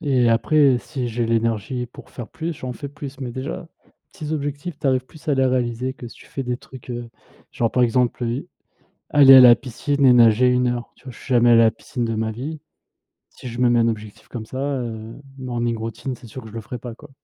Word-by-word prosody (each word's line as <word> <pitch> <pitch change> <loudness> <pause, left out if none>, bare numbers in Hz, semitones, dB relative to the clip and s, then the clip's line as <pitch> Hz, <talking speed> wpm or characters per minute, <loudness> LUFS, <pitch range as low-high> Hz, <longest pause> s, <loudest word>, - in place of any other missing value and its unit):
et 130 -5 +2
après 140 +3 +4
si 130 -2 -4
j'ai 115 0 -1
l'énergie 115 +2 -1
pour 120 - -14
faire 120 -3 -8
plus, 165 +1 -4
j'en 130 -2 -6
fais 140 +3 -7
plus! 140 -1 -9
Mais 125 -2 -4
déjà, 135 +5 -5 0.4
petits 160 -5 -6
objectifs, 145 +2 -4
tu 150 - -3
arrives 130 -1 +2
plus 155 +3 -17
à 145 - +3
les 135 0 +2
réaliser 125 0 -1
que 125 -2 -10
si - - -15
tu - - -16
fais 135 - -5
des 125 0 -2
trucs, 130 0 -14
heu, 120 -1 -6 0.4
genre 115 -2 0
par 125 - +2
exemple, 125 +1 +1
heu, 120 +8 -3 0.6
aller 140 -2 +8
à 130 - +10
la 120 -1 +9
piscine 135 +3 -1
et 125 - +7
nager 120 +1 +6
1 125 0 +2
heure, 120 -1 -3
tu - - -26
vois? 130 - -7
Je - - -15
suis 130 - -4
jamais 120 0 +5
aller 115 - +7
à 115 - +6
la 110 - +4
piscine 120 +1 -5
de 115 -1 -2
ma 110 0 -1
vie. 145 +7 -6 0.7
Si 125 - -10
je 120 - -7
me 125 -1 +4
mets 120 - +3
un 115 0 +3
objectif 110 -2 -6
comme 115 -3 -6
ça 130 - -7
heu, 120 -5 -4 0.2
morning 120 -2 -2
routine 115 +4 -5
c'est 120 - -14
sûr 130 +4 -9
que 110 - -10
je - - -13
le 115 - -4
ferai 125 +3 -7
pas, 120 -1 -8
quoi. - - -15
125 Hz, 245 wpm, -22 LUFS, 115-135 Hz, 0.7 s, à